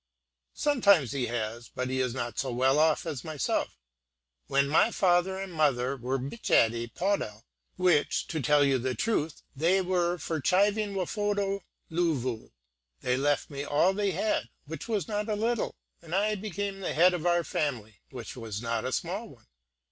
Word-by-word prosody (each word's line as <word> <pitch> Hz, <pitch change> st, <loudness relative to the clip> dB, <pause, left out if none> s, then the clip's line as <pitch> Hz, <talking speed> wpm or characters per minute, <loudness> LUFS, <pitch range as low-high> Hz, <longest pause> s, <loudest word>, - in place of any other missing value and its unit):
"Sometimes 200 Hz, -, +3 dB
he 130 Hz, -3 st, -1 dB
has; 120 Hz, 0 st, -4 dB
but 130 Hz, 0 st, -3 dB
he 130 Hz, 0 st, -1 dB
is 125 Hz, -1 st, -1 dB
not 120 Hz, -2 st, -3 dB
so 135 Hz, -3 st, -1 dB
well 130 Hz, +4 st, +3 dB
off 155 Hz, +1 st, +3 dB
as 150 Hz, -6 st, -4 dB
myself. 150 Hz, -, -2 dB, 0.7 s
When 140 Hz, 0 st, +2 dB
my 155 Hz, +9 st, +4 dB
father 190 Hz, -2 st, +2 dB
and 195 Hz, -2 st, -6 dB
mother 140 Hz, -4 st, +1 dB
were 130 Hz, +1 st, -2 dB
bitchadey 120 Hz, -, +1 dB
pawdel, 180 Hz, -, -1 dB, 0.3 s
which, 180 Hz, -5 st, +2 dB
to 160 Hz, -3 st, -2 dB
tell 145 Hz, +1 st, +4 dB
you 135 Hz, -2 st, +2 dB
the 130 Hz, +1 st, -2 dB
truth, 165 Hz, -9 st, -1 dB
they 170 Hz, +7 st, +3 dB
were 180 Hz, -1 st, +1 dB
for 160 Hz, -1 st, -3 dB
chiving 200 Hz, +5 st, +2 dB
wafodo 200 Hz, +1 st, -1 dB, 0.3 s
dloovu, 145 Hz, -9 st, -1 dB, 0.5 s
they 125 Hz, 0 st, +1 dB
left 145 Hz, +3 st, 0 dB
me 140 Hz, 0 st, -4 dB
all 145 Hz, +6 st, +3 dB
they 205 Hz, 0 st, 0 dB
had, 195 Hz, +4 st, -1 dB, 0.2 s
which 160 Hz, +8 st, -7 dB
was 210 Hz, -8 st, -1 dB
not 210 Hz, +1 st, -2 dB
a 210 Hz, -, +1 dB
little, 225 Hz, +2 st, -1 dB, 0.3 s
and 170 Hz, +1 st, -5 dB
I 210 Hz, +2 st, +2 dB
became 200 Hz, -1 st, -4 dB
the 195 Hz, -, -3 dB
head 180 Hz, +3 st, +6 dB
of 175 Hz, -1 st, -1 dB
our 175 Hz, 0 st, +3 dB
family, 120 Hz, -9 st, -3 dB
which 125 Hz, -4 st, -8 dB
was 110 Hz, -4 st, -5 dB
not 115 Hz, -1 st, -2 dB
a 130 Hz, -, -2 dB
small 195 Hz, -, -3 dB
one. 115 Hz, -4 st, -18 dB
160 Hz, 170 wpm, -29 LUFS, 130-195 Hz, 0.7 s, head